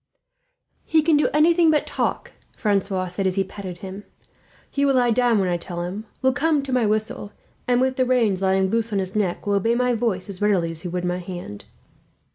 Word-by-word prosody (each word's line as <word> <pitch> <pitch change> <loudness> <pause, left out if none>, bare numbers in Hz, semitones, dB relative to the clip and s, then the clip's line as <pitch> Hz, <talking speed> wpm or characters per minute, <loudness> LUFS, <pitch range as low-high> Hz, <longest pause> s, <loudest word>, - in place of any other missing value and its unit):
"He 315 -1 +2
can 320 0 +4
do 295 - +3
anything 330 +2 +4
but 305 -1 +2
talk," - - -2 0.3
Francois 195 -3 0
said, 185 +2 -2
as 185 - 0
he 195 - +2
patted 190 -2 -8
him. 190 +2 -8 0.7
"He 280 - 0
will 275 -1 +3
lie 245 -2 +3
down 240 -1 +3
when 195 -2 +1
I 175 -1 0
tell 175 0 -6
him, 200 +5 -6 0.2
will 260 0 +4
come 295 0 +1
to 270 -2 -4
my 245 -4 +2
whistle 215 -1 -2 0.3
and, 245 -1 +3
with 260 0 +1
the 255 - +3
reins 230 -7 +2
lying 190 0 +2
loose 230 0 0
on 205 - 0
his 190 0 -3
neck, 195 -5 -1
will 205 - 0
obey 225 +4 +2
my 250 0 +1
voice 220 -6 -1
as 200 -1 -7
readily 190 -5 +2
as 165 -1 -5
he - - -5
would 180 +1 -3
my 180 0 -1
hand. 175 - -8
205 Hz, 220 wpm, -23 LUFS, 185-250 Hz, 0.7 s, can